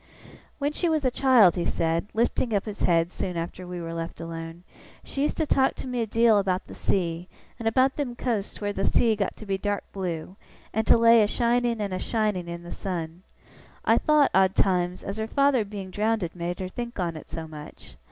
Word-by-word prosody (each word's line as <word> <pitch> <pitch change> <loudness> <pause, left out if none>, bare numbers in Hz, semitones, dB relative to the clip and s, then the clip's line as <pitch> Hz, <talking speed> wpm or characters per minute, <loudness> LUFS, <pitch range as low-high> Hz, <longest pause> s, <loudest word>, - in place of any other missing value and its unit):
'When 285 0 0
she 340 +3 0
was 310 -3 +1
a 255 - +3
child,' 245 -9 +5
he 175 - -1
said, 165 +3 0
lifting 230 0 +1
up 200 - 0
his 210 -2 -7
head 170 0 +2
soon 180 -2 -4
after 175 +2 -5
we 180 0 -5
were 165 -1 -5
left 165 0 -5
alone, 165 +1 -7 0.4
'she 275 - -4
used 295 - 0
to 315 - +1
talk 265 -2 +2
to - - -7
me 250 -2 -2
a 225 - -1
deal 225 -1 +4
about 190 -1 -1
the - - -11
sea, 175 -2 -1 0.3
and 225 - -2
about 260 +4 +3
them 265 -5 -2
coasts 225 -5 -2
where 205 -1 -2
the 195 - -2
sea 225 +1 +3
got 200 -2 -2
to 215 - -11
be 195 -1 -1
dark 205 0 -1
blue, 180 -1 -4 0.4
and 220 +1 0
to - - +7
lay 230 0 +6
a 210 - +4
shining 235 +1 +1
and 200 -2 -2
a 185 - -2
shining 210 -6 -1
in 170 0 -6
the 175 - -9
sun. 170 -2 -5 0.6
I - - +4
thowt, 300 -2 +4
odd 190 0 +4
times, 180 -1 +1
as 195 +2 -5
her 220 0 -2
father 275 -1 +3
being 200 -2 -7
drownded 210 -4 -1
made 175 0 -3
her 185 - -2
think 235 +3 -6
on 170 -3 -1
it 155 - -10
so 160 -1 -6
much. 150 -1 -11
200 Hz, 220 wpm, -26 LUFS, 175-235 Hz, 0.6 s, to